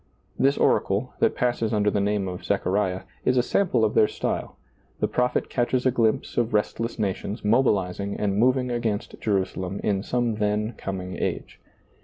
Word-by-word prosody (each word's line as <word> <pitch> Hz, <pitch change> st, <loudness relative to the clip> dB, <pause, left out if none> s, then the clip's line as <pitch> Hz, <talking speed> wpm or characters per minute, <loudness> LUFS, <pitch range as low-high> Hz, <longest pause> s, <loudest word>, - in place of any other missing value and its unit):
This 140 Hz, +1 st, +3 dB
oracle, -, -, +1 dB
that -, -, +2 dB
passes 120 Hz, -3 st, 0 dB
under 105 Hz, -2 st, +2 dB
the 100 Hz, -, 0 dB
name 100 Hz, -1 st, 0 dB
of 90 Hz, -1 st, -6 dB
Zechariah, 95 Hz, -1 st, 0 dB, 0.2 s
is 125 Hz, -, +2 dB
a 125 Hz, -, +4 dB
sample 125 Hz, -, +2 dB
of 105 Hz, -, 0 dB
their 105 Hz, -, +5 dB
style: -, -, -3 dB, 0.4 s
the -, -, +1 dB
prophet 125 Hz, 0 st, 0 dB
catches 125 Hz, +1 st, 0 dB
a 130 Hz, -, +4 dB
glimpse 115 Hz, -3 st, 0 dB
of 115 Hz, -2 st, +1 dB
restless 115 Hz, +2 st, -1 dB
nations 105 Hz, +1 st, -3 dB
mobilizing 100 Hz, -4 st, +1 dB
and 100 Hz, -2 st, 0 dB
moving 125 Hz, +3 st, +2 dB
against 115 Hz, -4 st, -2 dB
Jerusalem 95 Hz, -2 st, -1 dB
in 100 Hz, -2 st, +1 dB
some 120 Hz, 0 st, -1 dB
then 105 Hz, +2 st, 0 dB
com 95 Hz, -1 st, -4 dB
ing 90 Hz, 0 st, -6 dB
age. -, -, -3 dB
105 Hz, 170 wpm, -25 LUFS, 100-120 Hz, 0.4 s, their